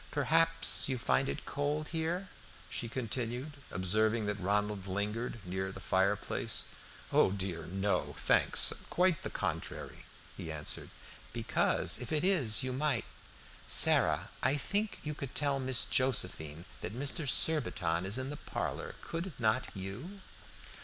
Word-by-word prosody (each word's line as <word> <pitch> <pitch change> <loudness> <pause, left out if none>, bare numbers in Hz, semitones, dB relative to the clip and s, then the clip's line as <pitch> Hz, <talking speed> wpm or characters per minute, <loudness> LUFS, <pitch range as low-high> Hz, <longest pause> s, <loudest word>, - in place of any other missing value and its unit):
"Perhaps 165 +2 +4
you 130 - -1
find 135 +3 0
it - - -5
cold 145 +2 -2
here?" 170 +4 -2 0.4
she 120 - -3
continued, 125 +3 -3 0.2
observing 110 +5 +1
that 105 0 -3
Ronald 105 0 -1
lingered 105 +6 -3
near 95 +1 -3
the - - -10
fire 95 +2 +1
place. - - -2 0.5
"Oh - - +4
dear, 95 -4 -4
no, 95 +3 -1
thanks, - - +5 0.2
quite 180 -2 +1
the - - -4
contrary," - - -5 0.3
he 80 - -7
answered. 75 -1 -4 0.4
"Because - - +2
if 125 - -6
it 155 0 +1
is 140 - +4
you 130 -1 -2
might 135 -3 -1 0.6
Sarah, - - +5
I 135 +3 +2
think 205 +8 -1
you 150 - -3
could 140 -3 -7
tell 140 -2 +1
Miss 130 -1 +2
Josephine 90 - +1
that 110 - -6
Mr. 145 +1 0
Surbiton 90 - +1
is 100 +5 0
in 130 +2 -4
the 145 - -6
parlor, - - -5
could 165 -4 -6
not 110 -2 +1
you?" 115 - -8
125 Hz, 140 wpm, -32 LUFS, 100-150 Hz, 0.6 s, thanks